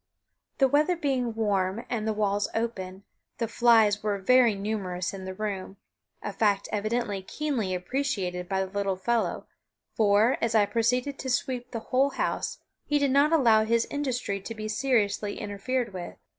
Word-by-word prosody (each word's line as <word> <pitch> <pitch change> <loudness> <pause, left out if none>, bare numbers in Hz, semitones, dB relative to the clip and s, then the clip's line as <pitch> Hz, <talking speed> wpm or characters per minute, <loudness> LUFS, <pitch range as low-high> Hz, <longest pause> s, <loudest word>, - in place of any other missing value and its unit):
The 270 - +5
weather 300 +6 +3
being 260 -8 -1
warm, 205 -1 0
and 220 -3 -2
the - - +2
walls 205 -1 0
open, 195 -4 -3 0.3
the 230 - -1
flies 225 -3 +4
were 210 -1 -1
very 235 +2 +4
numerous 195 -3 -3
in 190 -1 -7
the 190 - -5
room, 195 -2 -4 0.5
a 205 - -4
fact 200 -1 +1
evidently 215 -1 -1
keenly 225 -3 -2
appreciated 180 -4 -2
by 190 -1 0
the 190 - -12
little 200 -1 -1
fellow, 230 +5 -1 0.5
for, 215 +3 +3
as 230 -1 0
I 210 -2 +5
proceeded 250 +5 0
to 260 - -4
sweep 245 0 -1
the 230 - -4
whole 270 +2 +4
house - - -2 0.3
he 295 - +1
did 280 -2 +2
not 285 +3 +4
allow 230 -9 +5
his 230 +1 +2
industry 250 -8 -2
to 225 +4 -7
be 215 0 -5
seriously 215 -4 0
interfered 210 +3 -2
with. 180 -2 -6
220 Hz, 165 wpm, -27 LUFS, 200-250 Hz, 0.5 s, The